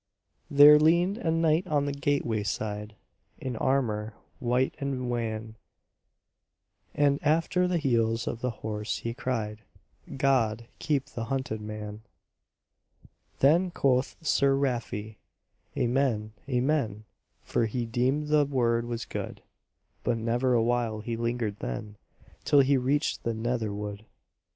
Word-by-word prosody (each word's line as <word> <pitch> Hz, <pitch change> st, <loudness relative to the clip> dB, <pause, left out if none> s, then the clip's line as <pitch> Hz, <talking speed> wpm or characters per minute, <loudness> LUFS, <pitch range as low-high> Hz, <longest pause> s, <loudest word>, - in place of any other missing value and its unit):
There 145 Hz, +1 st, +9 dB
leaned 175 Hz, +7 st, +3 dB
a 165 Hz, -, -1 dB
knight 165 Hz, +2 st, +2 dB
on 145 Hz, -4 st, +1 dB
the 145 Hz, -, -1 dB
gateway 140 Hz, -6 st, 0 dB
side 105 Hz, +1 st, -4 dB, 0.4 s
In 130 Hz, -2 st, -4 dB
armour 110 Hz, -4 st, 0 dB, 0.2 s
white 125 Hz, +2 st, +1 dB
and 130 Hz, -3 st, -2 dB
wan, 110 Hz, -2 st, -3 dB, 1.4 s
And 145 Hz, -1 st, +3 dB
after 165 Hz, +4 st, +2 dB
the 180 Hz, -1 st, +1 dB
heels 115 Hz, -6 st, +1 dB
of 115 Hz, -, -3 dB
the 125 Hz, -, 0 dB, 0.2 s
horse 105 Hz, 0 st, -2 dB
he 115 Hz, -, -4 dB
cried, 110 Hz, -4 st, -3 dB, 0.6 s
"God 120 Hz, -5 st, +2 dB
keep 140 Hz, -3 st, 0 dB
the 115 Hz, -3 st, -6 dB
hunted 130 Hz, -4 st, -3 dB
man!" 105 Hz, 0 st, -7 dB, 1.4 s
Then 170 Hz, +7 st, +5 dB
quoth 130 Hz, -6 st, +1 dB
Sir 140 Hz, -2 st, +3 dB
Rafe, 115 Hz, -5 st, -2 dB, 0.6 s
"Amen, 120 Hz, -4 st, 0 dB, 0.2 s
amen!" 125 Hz, -5 st, 0 dB, 0.4 s
For 115 Hz, -, 0 dB
he 120 Hz, +2 st, -2 dB
deemed 130 Hz, +6 st, 0 dB
the 150 Hz, -1 st, +4 dB
word 120 Hz, -4 st, +1 dB
was 120 Hz, 0 st, -4 dB
good; -, -, -6 dB, 0.6 s
But 120 Hz, -2 st, +1 dB
never 120 Hz, +3 st, +1 dB
a 115 Hz, -, +3 dB
while 115 Hz, -2 st, 0 dB
he 115 Hz, +2 st, -3 dB
lingered 115 Hz, -3 st, -2 dB
then 105 Hz, -, -5 dB, 0.5 s
Till 145 Hz, -, +5 dB
he 140 Hz, +1 st, +3 dB
reached 135 Hz, +4 st, 0 dB
the 115 Hz, -1 st, -2 dB
Nether 115 Hz, -1 st, -1 dB
Wood. 105 Hz, +1 st, -6 dB
120 Hz, 130 wpm, -28 LUFS, 110-140 Hz, 1.4 s, There